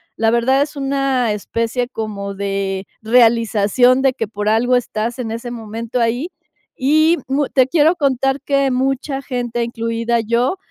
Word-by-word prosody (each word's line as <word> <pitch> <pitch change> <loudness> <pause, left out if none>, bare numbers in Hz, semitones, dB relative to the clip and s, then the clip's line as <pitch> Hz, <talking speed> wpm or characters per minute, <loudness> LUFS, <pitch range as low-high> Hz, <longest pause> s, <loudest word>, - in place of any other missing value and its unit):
la 225 0 +1
verdad, 250 +4 +2
es 295 +1 -2
una 275 -4 0
especie 230 +4 -2
como 205 -4 -5
de 195 -1 -3 0.2
realización 230 +1 +3
de 270 -1 +3
que 225 - -3
por 210 0 -5
algo 240 +3 +2
estás 230 -1 -2
en 230 -3 -3
ese 230 +2 -5
momento 230 +1 -5
ahí, 240 +8 0 0.5
y 310 +5 +3
muy 275 +2 0
te 260 -2 +3
quiero 315 +4 +3
contar 270 -3 0
que 275 -1 +1
mucha 270 +2 -1
gente, 240 -3 -3
incluida 230 0 -1
yo, 235 - 0
240 Hz, 150 wpm, -18 LUFS, 225-270 Hz, 0.5 s, realización